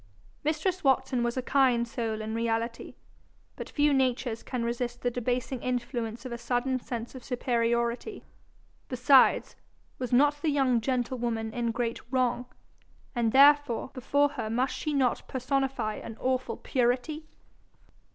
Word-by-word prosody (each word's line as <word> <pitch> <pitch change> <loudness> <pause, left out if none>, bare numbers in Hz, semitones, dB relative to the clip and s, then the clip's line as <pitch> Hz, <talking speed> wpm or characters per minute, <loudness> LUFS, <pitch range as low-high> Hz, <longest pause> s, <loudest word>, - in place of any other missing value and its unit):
Mistress 320 +5 -1
Watson 265 -2 +2
was 240 +1 -1
a 255 - -1
kind 255 -3 +3
soul 225 -2 -3
in 220 0 -4
reality, 230 0 -2 0.6
but - - -7
few 295 -1 +2
natures 255 -3 0
can 250 -3 -4
resist 240 +1 -3
the 245 - +1
debasing 245 +1 -2
influence 240 -1 -3
of 255 - -5
a 235 - -5
sudden 255 +2 0
sense 235 -1 -6
of 260 -2 -10
superiority. 235 - -1 0.7
Besides, 260 +1 +4 0.4
was 250 -1 -3
not 290 +3 +4
the 315 - +1
young 265 -5 +2
gentlewoman 235 -3 -2
in 240 -1 -1
great 230 0 -2
wrong, 250 -1 0 0.7
and 235 -2 +1
therefore 280 -2 +5
before 285 +3 +2
her 220 -6 -4
must 250 +4 0
she 305 - -3
not 265 -4 +1
personify 260 -4 -1
an 225 - -8
awful 260 0 -1
Purity? 260 +5 -1
250 Hz, 140 wpm, -28 LUFS, 235-270 Hz, 0.7 s, therefore